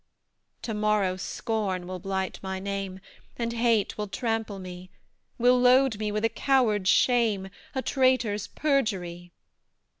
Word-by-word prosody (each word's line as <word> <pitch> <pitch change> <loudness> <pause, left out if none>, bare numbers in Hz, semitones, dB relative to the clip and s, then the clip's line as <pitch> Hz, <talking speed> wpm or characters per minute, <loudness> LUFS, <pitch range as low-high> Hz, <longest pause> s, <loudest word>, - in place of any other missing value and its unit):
To 225 - -3
morrow, 210 -3 +1
Scorn 190 -1 -3
will 185 0 -6
blight 190 +1 -3
my 190 0 -4
name, 195 -1 -4 0.4
And 235 -1 -2
Hate 230 -3 +1
will 210 - -2
trample 225 -1 -2
me, 185 -1 -9 0.5
Will 250 +1 +4
load 250 -2 +4
me 210 -1 -1
with 210 +2 0
a - - +6
coward's 225 -6 +2
shame 225 -6 +3 0.3
A 265 - -1
traitor's 255 -6 +1
perjury. 190 - -1
210 Hz, 130 wpm, -27 LUFS, 190-240 Hz, 0.5 s, a